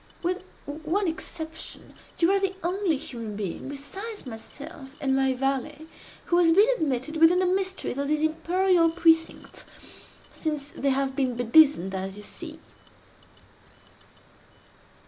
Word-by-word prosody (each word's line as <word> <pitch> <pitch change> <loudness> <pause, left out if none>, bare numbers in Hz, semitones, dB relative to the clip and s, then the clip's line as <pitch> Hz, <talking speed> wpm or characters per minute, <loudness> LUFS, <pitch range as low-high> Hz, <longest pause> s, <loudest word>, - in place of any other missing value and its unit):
With 365 +2 -1 0.2
one 320 +7 -1
exception, 320 0 -6 0.2
you 340 +2 +4
are 395 - +3
the 385 -1 -1
only 360 -2 +1
human 230 -6 -6
being 200 +4 -4
besides 385 +11 -7
myself 270 +4 -10
and 270 -1 +1
my 265 -1 +2
valet, 275 +3 -2 0.4
who 345 - +3
has 335 -2 +5
been 405 +6 +6
admitted 300 - -1
within 325 +3 +6
the 370 - +2
mysteries 375 -6 -1
of 280 - -1
these 305 +1 +1
imperial 335 +2 +3
precincts, 325 -1 +1 0.7
since 300 -3 -4
they 275 - -1
have 270 0 0
been 260 -3 0
bedizened 245 - +4
as 190 +1 -4
you 210 - -9
see!" 315 +8 -8
315 Hz, 130 wpm, -26 LUFS, 270-345 Hz, 0.7 s, been